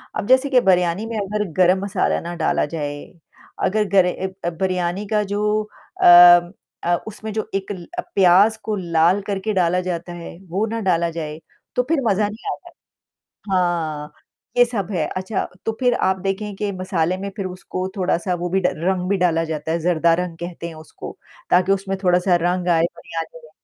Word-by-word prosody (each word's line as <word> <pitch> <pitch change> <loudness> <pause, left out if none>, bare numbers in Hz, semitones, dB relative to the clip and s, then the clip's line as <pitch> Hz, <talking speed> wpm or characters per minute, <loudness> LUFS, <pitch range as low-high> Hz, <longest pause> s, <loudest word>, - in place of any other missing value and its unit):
अब 205 - -3
जैसे 260 +2 +4
कि 260 -2 +5
बिरयानी 180 0 +2
में 230 -1 -4
अगर 210 +1 -1 0.2
गरम 185 +1 +5
मसाला 200 -2 0
ना 170 +1 -6
डाला 165 -2 +1
जाए, 145 -2 -5 0.6
अगर 215 +2 +2
गरे 190 -2 +4
ए 190 +1 -5
अ, - - +2
बिरयानी 180 +2 -2
का 210 0 +1
जो 210 +1 0 0.4
अम 175 0 +8 0.3
अ, 175 0 +2
उसमें 220 0 -7
जो 220 0 -3
एक 195 +1 -3 0.4
प्याज़ 195 +4 +5
को 215 - -2
लाल 175 +1 +2
करके 205 +1 -2
डाला 180 -1 +2
जाता 175 -1 -4
है, 170 -1 -9
वो 195 +6 0
ना 230 +1 -3
डाला 170 -4 +1
जाए 155 -2 -6 0.4
तो 250 - +2
फिर 320 -4 +2
मज़ा 205 0 +2
नहीं 215 +3 -6
आता। - - -13 0.8
हाँ, 165 -5 -1 0.4
ये 245 - +7
सब 215 -5 -4
है, 165 -5 0
अच्छा 190 +3 -2 0.2
तो 225 - +1
फिर 245 -1 +3
आप 190 -4 +1
देखें 195 +2 -3
कि 205 0 -2
मसाले 185 -2 -1
में 200 +1 -4
फिर 195 -3 -3
उसको 185 0 -5
थोड़ा-सा 180 -1 0
वो 175 0 -3
भी 190 +2 +1
ड 180 - +2 0.2
रंग 185 -1 0
भी 200 - +3
डाला 170 -3 +1
जाता 160 0 -3
है, 170 - 0
ज़रदा 170 0 +2
रंग 175 -1 -3
कहते 170 0 -6
हैं 165 - -9
उसको 155 0 -10 0.3
ताकि 185 +2 +4
उसमें 195 0 -1
थोड़ा-सा 180 0 +3
रंग 180 +1 0
आए 165 -2 +3
बिरयानी 165 0 -7
में। 155 - -16
185 Hz, 190 wpm, -21 LUFS, 170-200 Hz, 0.8 s, अम